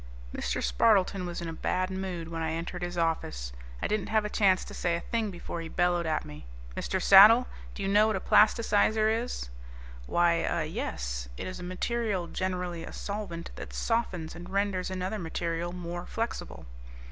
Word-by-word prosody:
Mr. - - -2
Spardleton 195 -4 +3
was 175 0 -5
in 170 - -4
a 165 - -4
bad 185 +3 -1
mood 185 -3 -4
when 165 -1 -4
I 160 0 -1
entered 170 +2 -4
his 175 0 -4
office. 110 - -1 0.3
I - - +2
didn't 210 -3 -1
have 220 -1 +2
a 210 - -3
chance 190 -3 +3
to - - -9
say 175 -1 0
a - - -1
thing 225 +2 -2
before 175 -2 -6
he 165 - -6
bellowed 175 -1 +1
at 155 -1 0
me, 75 -3 -10 0.3
"Mr. 190 - -1
Saddle, 210 +7 +9 0.3
do 200 - -4
you - - 0
know 205 +2 +5
what 220 - +1
a - - 0
plasticizer 215 +1 +4
is?" 225 - -2 0.6
"Why, 170 -1 +3
ah, - - 0
yes. - - -4
It - - -5
is 185 - -6
a - - -7
material, 195 +1 -1
generally 180 -2 -3
a - - -8
solvent, 200 -5 -5
that - - -8
softens 185 -9 -1
and 175 +1 -9
renders 195 -2 0
another 185 +3 -3
material 170 0 -2
more 175 0 -6
flexible." 230 +1 -4
180 Hz, 185 wpm, -29 LUFS, 170-205 Hz, 0.6 s, Saddle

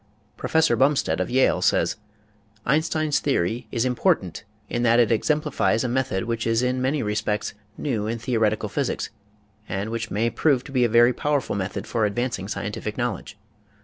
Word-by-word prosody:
Professor 160 -5 +2
Bumstead 130 - +2
of 95 - -1
Yale 130 +2 +3
says: - - +2 0.7
Einstein's 155 +1 +1
theory 115 -3 -1
is 115 +1 0
important 125 - 0 0.2
in 120 - -2
that 120 0 +4
it 120 -2 +4
exemplifies 150 -1 +1
a - - 0
method 130 -5 -1
which 115 -1 -2
is 115 +2 +2
in 125 0 0
many 135 +3 0
respects 105 0 -1 0.2
new 115 -8 -2
in 115 +1 -2
theoretical 110 -2 0
physics 140 +5 -2 0.6
and 100 +4 -3
which 115 0 -3
may 115 +4 0
prove 135 0 +2
to - - -11
be 130 -2 +2
a 120 - +3
very 120 +2 +5
powerful 145 -4 -1
method 100 0 -3
for 115 -3 0
advancing 115 -2 -2
scientific - - -4
knowledge. - - -3
120 Hz, 165 wpm, -24 LUFS, 110-130 Hz, 0.7 s, very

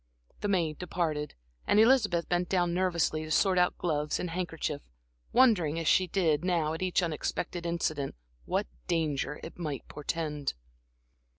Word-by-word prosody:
The - - -2
maid 170 -6 0
departed, 160 -4 -2 0.3
and 205 - +4
Elizabeth 215 -8 +4
bent 175 0 0
down 175 -2 +2
nervously 170 -3 +1
to 155 - -7
sort 185 +3 +3
out 180 - +2
gloves 150 -3 -1
and 180 - -3
handkerchief, 165 -4 -3 0.5
wondering 205 - +4
as 165 -2 -2
she 185 - +4
did 165 -4 +1
now 170 -4 +1
at 160 - -5
each 185 0 +1
unexpected 170 +2 -2
incident, 155 - -1 0.3
what - - 0 0.2
danger 150 -3 -1
it 165 - -9
might 150 -6 -4
portend. 150 -1 -3
170 Hz, 150 wpm, -30 LUFS, 155-180 Hz, 0.5 s, and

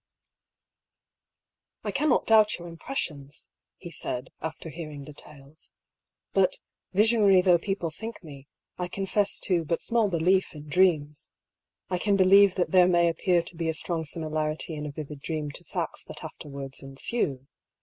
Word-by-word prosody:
''I - - -3
cannot 300 -4 +2
doubt 215 -1 +5
your 175 - -9
impressions," 160 - -5 0.3
he 175 - -10
said, 125 -5 -4
after 160 +1 -6
hearing 155 -3 -7
details. 145 +1 -12 0.6
'^ - - -55
But, 190 -2 +3 0.3
visionary 210 -1 +5
though 180 -2 +5
people 185 -3 -2
think 220 +6 -8
me, 140 -3 -11 0.3
I 180 - -1
confess 195 +2 0
to 175 -3 +1
but 165 +2 -1
small 230 -3 +1
belief 180 +1 +2
in 150 0 -10
dreams. 150 -3 +1 0.6
I 180 - 0
can 205 +1 +2
be 190 - +5
lieve 195 0 +6
that 180 - 0
there 180 -2 +6
may 170 -1 +4
appear 170 +1 +1
to 170 - -9
be 165 0 -2
a 160 - -1
strong 165 0 -2
similarity 155 +1 -2
in 150 -1 -4
a - - -5
vivid 150 0 -7
dream 155 -1 -3
to - - -11
facts - - -4
that - - -9
afterwards 140 -2 -8
ensue. 135 - -2
170 Hz, 160 wpm, -27 LUFS, 150-190 Hz, 0.6 s, lieve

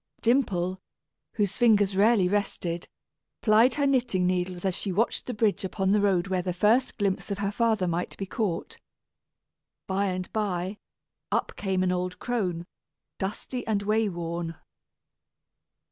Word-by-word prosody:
Dimple, 190 -7 +1 0.5
whose 205 -3 -1
fingers 205 -5 +4
rarely 205 -1 +4
rested, 180 -3 -2 0.6
plied 225 +3 +5
her 285 - +1
knitting 245 -9 +2
needles 180 0 -1
as 190 - +1
she 195 - -2
watched 215 +6 0
the 250 - -2
bridge 210 -2 +1
upon 190 0 0
the 210 0 +4
road 190 -3 +2
where 185 -2 0
the 180 0 -2
first 215 +8 +2
glimpse 200 0 -1
of 200 - -2
her 200 0 -1
father 220 -4 +1
might 170 +1 -2
be 195 - -3
caught. 195 -3 -3 1.1
By 195 +1 0
and 185 -1 -4
by, 195 -2 -2 0.5
up - - 0
came 190 -2 0
an 185 - +2
old 180 0 -2
crone, 180 -8 -2 0.5
dusty 210 +6 -4
and 205 -2 0
way 215 +1 +2
worn. 170 -1 -4
195 Hz, 145 wpm, -27 LUFS, 180-215 Hz, 1.1 s, plied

